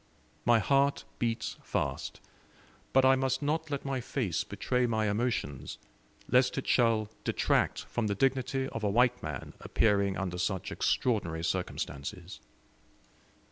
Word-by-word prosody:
My 120 -1 +6
heart 140 +5 +2
beats 115 -1 -1
fast, - - -3 0.7
but 135 0 +5
I 130 0 +7
must 130 +1 0
not 155 +2 0
let 140 -2 -3
my 135 -2 -1
face 115 - -1
betray 125 -1 0
my 110 -2 +1
emotions, 105 - -2 0.5
lest 125 +1 +3
it 135 - -2
shall 115 -3 +2
detract - - +1
from 120 -3 -2
the 100 - 0
dignity 135 +2 +1
of 115 - -5
a 105 - +2
white 125 +3 +3
man 75 -4 -6
appearing 100 -3 +2
under 90 -2 -3
such 95 0 -1
extraordinary 85 -10 0
circumstances. 85 +1 -4
115 Hz, 135 wpm, -30 LUFS, 100-130 Hz, 0.7 s, I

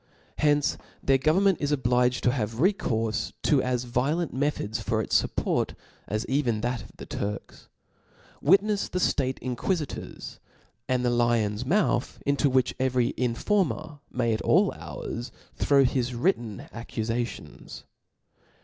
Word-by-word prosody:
Hence 145 -1 +2 0.2
their 135 -1 +4
government 180 +6 +3
is 145 0 0
obliged 125 -2 +2
to 125 - +4
have 110 -4 -2
recourfe 120 - 0
to 145 -4 +4
as 125 -1 -1
violent 140 +8 0
methods 130 -5 -1
for 110 0 0
its 110 - +3
fup« - - -6
porty - - 0 0.3
as 105 +2 -2
even 125 -6 0
that 120 0 -1
of - - -15
the - - -8
Turks; 100 0 -5 0.7
witnefs 200 +6 +3
che 180 - -2
fiate 130 -7 +1
inquifitors 140 +5 -3 0.2
*, 115 +7 -38
and 125 -1 +1
the 120 - +3
lion*s 120 -1 +1
mouth 175 -7 +1
into 140 0 +2
which 130 -1 +2
every 130 -2 +1
informer 145 - 0
may 120 -2 +1
at 110 - -2
all - - +4
hours 120 +2 -6 0.2
throw 140 -1 +4
his 125 -1 0
written 120 - 0
ac 115 0 -7
cufaiions. 115 0 -4
125 Hz, 140 wpm, -27 LUFS, 120-145 Hz, 0.7 s, their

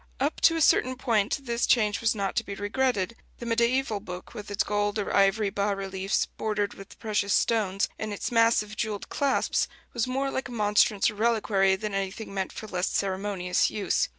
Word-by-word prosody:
Up 285 +4 -1
to 330 - +5
a 325 - 0
certain 255 -3 +4
point 235 +1 0
this 235 -1 0
change 210 -4 +2
was 230 0 +2
not 200 -2 -2
to - - +1
be 200 - -6
regretted: 205 0 0 0.2
the 235 - -8
mediæval 235 -2 +1
book, 180 -2 -8
with 210 -1 -8
its 205 0 0
gold 205 0 -1
or 205 - -2
ivory 200 +1 +3
bas 200 0 0
reliefs 195 0 -1
bordered 210 -2 -2
with 195 0 -13
precious 210 -2 0
stones, 200 -4 +1
and 215 -1 -3
its 205 - -4
massive 230 -2 +3
jewelled 215 -2 -3
clasps, 280 -1 +1 0.3
was 240 0 0
more 270 +2 -1
like 265 - -3
a - - -10
monstrance 210 -2 +3
or - - -11
reliquary 210 -3 +2
than 210 +1 -4
anything 195 +2 -4
meant 190 -1 -2
for - - -8
less 185 -3 -2
ceremonious 190 -2 0
use. 210 - 0
210 Hz, 190 wpm, -27 LUFS, 195-235 Hz, 0.3 s, to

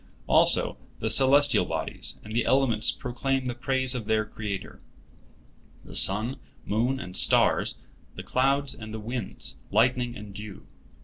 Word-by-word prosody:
Also - - +5 0.2
the 110 - -2
celestial 140 +4 +4
bodies - - -4
and 110 - -10
the 115 0 0
elements 125 -5 +1
proclaim 130 +2 -3
the 125 - -3
praise 130 +1 -1
of 120 -4 -5
their 110 0 0
Creator—the 105 -2 -8 1.1
sun, 110 +7 +4 0.3
moon, 120 +6 -1
and 90 -7 -9
stars, - - +4 0.4
the - - -8
clouds 135 +1 0
and 110 -1 -9
the - - -6
winds, 110 - -5
lightning 120 +3 0
and 105 -1 -11
dew. 100 -6 -10
120 Hz, 135 wpm, -25 LUFS, 110-130 Hz, 1.1 s, Also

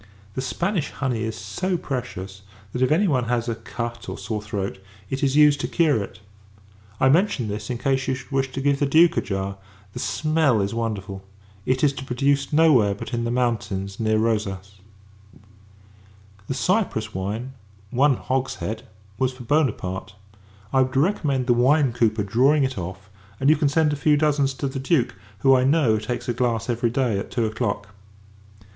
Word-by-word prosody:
The 130 - -3
Spanish 170 +5 -1
honey 130 -5 -2
is 110 -1 -3
so 175 - -2
precious, 100 - -5 0.3
that 125 - -3
if 130 - +3
[any 190 +7 +3
one 130 -7 +1
has] 120 0 -1
a 115 - 0
cut, 115 +1 -6
or - - -5
sore 110 -2 -4
throat, 100 -2 -4 0.3
it 135 - -2
is 135 -1 +1
used 150 -1 +6
to - - -1
cure 155 - +2
it. 100 +1 -8 0.8
I 130 - +4
mention 145 - +2
this, 105 +3 -5
in 125 - -2
case 135 +1 0
you 130 - +1
should 130 - -11
wish 135 -1 0
to 135 - -3
give 140 0 +2
the 145 - +2
Duke 165 +4 +5
a - - +3
jar. 95 0 -3 0.4
The - - -6
smell 155 +2 +1
is 100 +1 -1
wonderful! 100 -4 -4 0.4
It 130 +2 +1
is 145 -2 +4
to 135 - -7
be 135 - -9
produced 140 +2 +1
no 160 +1 +5
where, 105 -6 +3
but 105 - -8
in 115 0 -1
the - - -1
mountains 105 -5 -1
near 110 -1 +2
Rosas. 100 -3 -2 1.7
The 135 - -2
Cyprus 140 - 0
wine, 105 +7 -4 0.4
one 135 +2 +4
hogshead, 130 -4 -2 0.4
was 130 0 +1
for 125 -1 -10
Buonaparte. 100 -9 -1 0.6
I 130 - +5
would 130 +1 0
recommend 140 -5 +1
the 120 - +4
wine 130 +2 +3
cooper 110 -3 +1
drawing 130 +8 +3
it 130 -1 -1
off: 95 +1 -7 0.3
and 135 +3 +4
you - - +5
can 145 -2 +1
send 150 0 +2
a - - 0
few 150 +1 +3
dozens 145 -3 +1
to 140 - -2
the 135 0 -4
Duke; 135 -2 +1 0.3
who, 135 - +6
I 125 - +3
know, 130 -6 +3
takes 120 +2 -4
a 120 - 0
glass 120 -1 0
every 120 0 0
day 120 -4 0
at - - -6
two 120 -2 0
o'clock. 105 -2 -2
125 Hz, 190 wpm, -23 LUFS, 110-140 Hz, 1.7 s, used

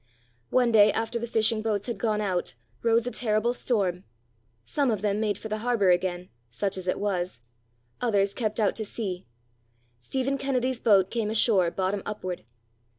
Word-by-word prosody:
One 250 -2 +3
day 210 -1 +7
after 225 +2 -2
the 235 - -4
fishing 220 -1 +1
boats 215 -2 -1
had 235 -5 -4
gone 215 -2 0
out, 185 -4 -2 0.3
rose 230 0 +3
a 245 - -2
terrible 225 0 +1
storm. 195 -8 -1 0.6
Some 285 -3 0
of 215 -3 -1
them 205 0 +1
made 210 -3 0
for 220 - -7
the 215 0 -3
harbour 225 -5 +2
again 180 0 0 0.2
such 195 - -2
as 185 -1 -6
it 185 - +1
was; 180 - -2 0.6
others 200 -5 +2
kept 220 -2 -2
out 210 - +3
to 220 - -2
sea; 195 - -5 0.7
Stephen 265 - -2
Kennedy's 255 -2 0
boat 195 -5 +4
came 225 -3 -1
ashore 210 -5 +3
bottom 190 +3 -1
upward. 185 - -5
215 Hz, 170 wpm, -27 LUFS, 190-235 Hz, 0.7 s, day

